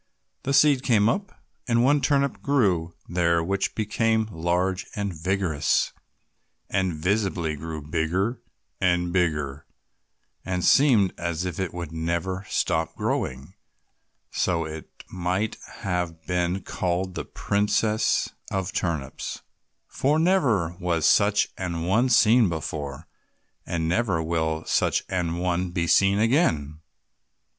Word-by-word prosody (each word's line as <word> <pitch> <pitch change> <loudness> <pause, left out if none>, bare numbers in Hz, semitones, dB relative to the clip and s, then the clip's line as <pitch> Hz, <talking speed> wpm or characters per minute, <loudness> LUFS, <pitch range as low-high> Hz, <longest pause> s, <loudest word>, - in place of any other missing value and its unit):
The 140 - -2
seed 145 -3 +5
came 110 -6 +3
up, 195 - -1 0.4
and 120 -1 +3
one 145 +2 +4
turnip 140 -1 +1
grew 95 -12 +1
there 85 -1 +1
which 95 +3 -1
became 110 0 +1
large 90 +2 -1
and 100 -2 -2
vigorous, 85 -2 0 0.8
and 95 -3 0
visibly 90 -2 0
grew 80 0 -6
bigger 90 +9 -1 0.4
and 90 -1 +1
bigger, 75 -5 -1 0.8
and 90 -1 -2
seemed 120 -10 +5
as 85 0 -2
if 90 -1 -4
it 95 -3 -2
would 85 -3 -6
never 85 +4 -2
stop 80 -1 0
growing, 65 +7 -3 0.8
so 85 -3 0
that 80 - -6
it 80 - -11
might 95 +4 -1 0.3
have 90 -4 -2
been 90 +1 -1
called 90 +1 -2
the - - -4
princess 105 +1 +1 0.2
of 95 -1 -2
turnips, 80 -7 -3 0.4
for 145 +3 +1
never 130 - +2
was 85 -4 0
such 100 0 +4
an 85 -3 -3
one 110 +9 +2
seen 115 -2 +5
before, 75 -4 -5 0.6
and 80 -2 -1
never 90 0 +1
will 80 -1 -1
such - - +1
an 85 -3 -1
one 90 0 -1
be 85 -1 -1
seen 95 +4 +4
again. 85 - +1
90 Hz, 125 wpm, -25 LUFS, 80-105 Hz, 0.8 s, seed